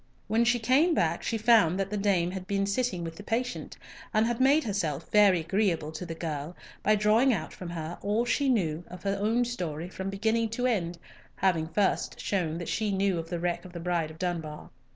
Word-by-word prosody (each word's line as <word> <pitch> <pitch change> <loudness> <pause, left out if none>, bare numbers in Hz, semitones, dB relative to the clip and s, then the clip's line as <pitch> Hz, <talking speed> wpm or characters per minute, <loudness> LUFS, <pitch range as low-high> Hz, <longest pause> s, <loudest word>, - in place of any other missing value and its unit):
When 230 +2 +2
she 245 +1 +3
came 270 +9 +3
back, 165 - +1
she 230 - -1
found 215 -6 +4
that 195 0 -2
the - - -1
dame 195 -4 +1
had 185 -1 -6
been 195 -1 0
sitting 200 -3 -1
with 165 -1 -6
the 205 - -9
patient, 245 +4 -3 0.4
and 215 +1 +4
had 240 +1 -1
made 285 +4 +5
herself 170 -8 -2
very 200 -5 +5
agreeable 170 -3 0
to 165 +3 -6
the 165 - -5
girl 160 0 -4 0.3
by 215 - +3
drawing 215 +5 +4
out 170 -9 -2
from 180 - -8
her 165 0 -5
all 210 +4 +1
she 275 +3 +1
knew 170 -9 0
of 180 0 -11
her 200 0 -1
own 230 +4 +2
story 175 -8 -4
from 190 +1 -5
beginning 220 +3 0
to 245 +3 -2
end, 175 -8 0 0.4
having 175 -4 +1
first 195 +3 0
shown 170 -5 -1
that 170 - -5
she 215 -1 -1
knew 195 -2 +1
of 165 0 -6
the 175 - -3
wreck 175 0 -1
of 180 -2 -12
the 170 - -6
Bride 170 -2 -1
of 160 - -12
Dunbar. 165 -4 -4
195 Hz, 215 wpm, -28 LUFS, 170-220 Hz, 0.4 s, made